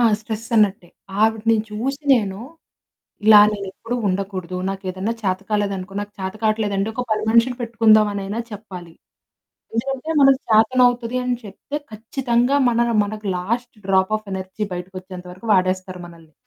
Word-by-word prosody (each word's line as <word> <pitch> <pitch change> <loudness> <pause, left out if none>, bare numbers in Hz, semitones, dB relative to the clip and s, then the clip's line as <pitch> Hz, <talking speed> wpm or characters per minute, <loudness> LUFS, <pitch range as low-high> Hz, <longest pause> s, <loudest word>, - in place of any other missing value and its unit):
ఆ! - - +3 0.2
స్ట్రెస్ 220 0 -6
అన్నట్టే 200 -4 +2 0.3
ఆవిడని 225 +1 +3
చూసి 265 +7 -3
నేను 200 -5 -1 0.9
ఇలా 215 -1 +9
నేనెప్పుడు 205 +3 -5
ఉండకూడదు. 185 -2 -3
నాకేదైనా 190 +2 -3
చేతకాలేదనుకో 195 0 -2
నాకు 205 0 -7
చేత 190 0 -3
కావట్లేదంటే 215 -2 0
ఒక 250 +1 -2
పని 215 0 +1
మనిషిని 235 +2 +3
పెట్టుకుందాం 225 -2 +4
అని 200 -1 -4 0.3
చెప్పాలి. 185 -5 -9 0.8
ఎందుకంటే 270 +6 -3
మనకు 270 -1 +6
చేతనవుతుంది 245 +2 +3
అని 250 0 +1
చెప్తే 210 +7 -8 0.2
ఖచ్చితంగా 240 +3 0
మన 235 0 +2 0.2
మనకు 210 +1 -6
లాస్ట్ 230 +7 -3
డ్రాప్ 190 +1 +2
ఆఫ్ 215 -1 -16
ఎనర్జీ 190 +2 -4
బయటకి 180 +2 -7
వచ్చేంత 185 -1 -10
వరకు 185 +6 -11
వాడేస్తారు 185 -1 0
మనల్ని. 165 -2 -16
210 Hz, 135 wpm, -21 LUFS, 190-230 Hz, 0.9 s, ఇలా